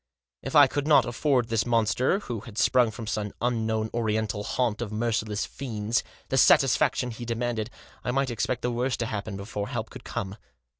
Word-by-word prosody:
If 135 Hz, -, -5 dB
I 145 Hz, -1 st, +9 dB
could 145 Hz, +2 st, -2 dB
not 150 Hz, -, +6 dB
afford 125 Hz, 0 st, +1 dB
this 110 Hz, -1 st, +1 dB
monster, 120 Hz, -, +1 dB
who 120 Hz, -, -5 dB
had 110 Hz, 0 st, -12 dB
sprung 125 Hz, -2 st, +4 dB
from 110 Hz, +1 st, -7 dB
some 105 Hz, -1 st, -3 dB
unknown 110 Hz, -2 st, 0 dB
oriental 110 Hz, -2 st, -1 dB
haunt 120 Hz, -1 st, -1 dB
of 115 Hz, -3 st, -4 dB
merciless 110 Hz, -2 st, -1 dB
fiends, 115 Hz, -4 st, -2 dB, 0.3 s
the -, -, 0 dB
satisfaction 125 Hz, -, +4 dB
he 115 Hz, +1 st, -8 dB
de 115 Hz, 0 st, -2 dB
manded, 115 Hz, -2 st, -2 dB, 0.4 s
I -, -, -3 dB
might 135 Hz, 0 st, +1 dB
expect 120 Hz, +2 st, -2 dB
the 125 Hz, -, 0 dB
worst 125 Hz, +1 st, -1 dB
to -, -, 0 dB
happen 100 Hz, -2 st, -4 dB
before 100 Hz, +1 st, -4 dB
help -, -, -4 dB
could -, -, -10 dB
come. 100 Hz, +1 st, -5 dB
115 Hz, 190 wpm, -27 LUFS, 110-125 Hz, 0.4 s, I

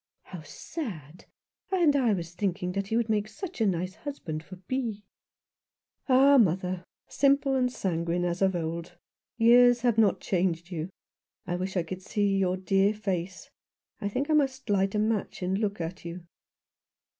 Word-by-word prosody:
" -, -, -54 dB
How 175 Hz, -, -6 dB
sad! 175 Hz, -, -7 dB, 0.5 s
And 340 Hz, -6 st, +3 dB
I 255 Hz, -5 st, +3 dB
was 170 Hz, -3 st, -4 dB
thinking 180 Hz, -1 st, -2 dB
that 195 Hz, +1 st, -3 dB
he 225 Hz, -, 0 dB
would 235 Hz, -1 st, +1 dB
make 215 Hz, -1 st, 0 dB
such 240 Hz, -, -7 dB
a 220 Hz, -, +4 dB
nice 185 Hz, 0 st, -1 dB
husband 185 Hz, -, -6 dB
for 185 Hz, -, -11 dB
Bee." 215 Hz, +2 st, -4 dB, 1.1 s
"Ah, 270 Hz, +2 st, +6 dB
mother, 185 Hz, -2 st, +1 dB, 0.2 s
simple 275 Hz, 0 st, +2 dB
and 250 Hz, -1 st, +1 dB
sanguine 175 Hz, -4 st, -1 dB
as 175 Hz, +1 st, -2 dB
of 190 Hz, -1 st, +3 dB
old. 170 Hz, +1 st, -4 dB, 0.4 s
Years 245 Hz, +1 st, +6 dB
have 235 Hz, -2 st, +2 dB
not 210 Hz, -3 st, +4 dB
changed 175 Hz, -2 st, -1 dB
you. 165 Hz, 0 st, -4 dB, 0.6 s
I 175 Hz, -1 st, -2 dB
wish 185 Hz, +2 st, -3 dB
I 175 Hz, -, +2 dB
could 185 Hz, +3 st, -7 dB
see 200 Hz, +1 st, 0 dB
your 185 Hz, -1 st, +1 dB
dear 195 Hz, +3 st, +2 dB
face. 185 Hz, -3 st, -4 dB, 0.5 s
I 200 Hz, -, -2 dB
think 260 Hz, +7 st, -2 dB
I 315 Hz, -, +1 dB
must 270 Hz, -5 st, +1 dB
light 195 Hz, 0 st, +1 dB
a -, -, +2 dB
match 215 Hz, -3 st, -1 dB
and 190 Hz, +2 st, 0 dB
look 205 Hz, -3 st, -1 dB
at 170 Hz, +2 st, -5 dB
you." 170 Hz, +1 st, -7 dB
195 Hz, 170 wpm, -28 LUFS, 180-235 Hz, 1.1 s, Ah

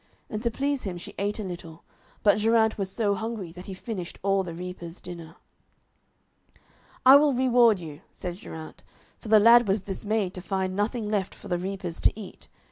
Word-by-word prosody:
And 215 Hz, -, -3 dB
to 235 Hz, -, +1 dB
please 280 Hz, +3 st, -1 dB
him 185 Hz, -3 st, -4 dB
she 175 Hz, -, -9 dB
ate 205 Hz, +1 st, -1 dB
a 215 Hz, -, -4 dB
little, 175 Hz, -3 st, -8 dB, 0.4 s
but 205 Hz, 0 st, +5 dB
Geraint 220 Hz, 0 st, +3 dB
was 195 Hz, -2 st, -3 dB
so 205 Hz, 0 st, 0 dB
hungry 220 Hz, -4 st, -4 dB
that 180 Hz, +2 st, -11 dB
he 190 Hz, -, -6 dB
finished 185 Hz, -4 st, -6 dB
all 195 Hz, 0 st, +2 dB
the 170 Hz, -3 st, -6 dB
reapers' 180 Hz, -1 st, -7 dB
dinner. 170 Hz, -2 st, -9 dB, 1.7 s
'I 265 Hz, +2 st, +10 dB
will 290 Hz, -1 st, +3 dB
reward 240 Hz, -4 st, +4 dB
you,' 155 Hz, -4 st, -9 dB
said 175 Hz, -1 st, -6 dB
Geraint, 160 Hz, -5 st, -10 dB, 0.4 s
for -, -, -11 dB
the 215 Hz, 0 st, +7 dB
lad 235 Hz, +2 st, +7 dB
was 195 Hz, 0 st, +1 dB
dismayed 200 Hz, 0 st, -2 dB
to 180 Hz, -, -7 dB
find 190 Hz, 0 st, -2 dB
nothing 210 Hz, +2 st, -1 dB
left 205 Hz, -3 st, -1 dB
for 205 Hz, -, -12 dB
the 175 Hz, -1 st, 0 dB
reapers 185 Hz, -2 st, -5 dB
to -, -, +2 dB
eat. 200 Hz, -, -10 dB
195 Hz, 190 wpm, -26 LUFS, 180-220 Hz, 1.7 s, I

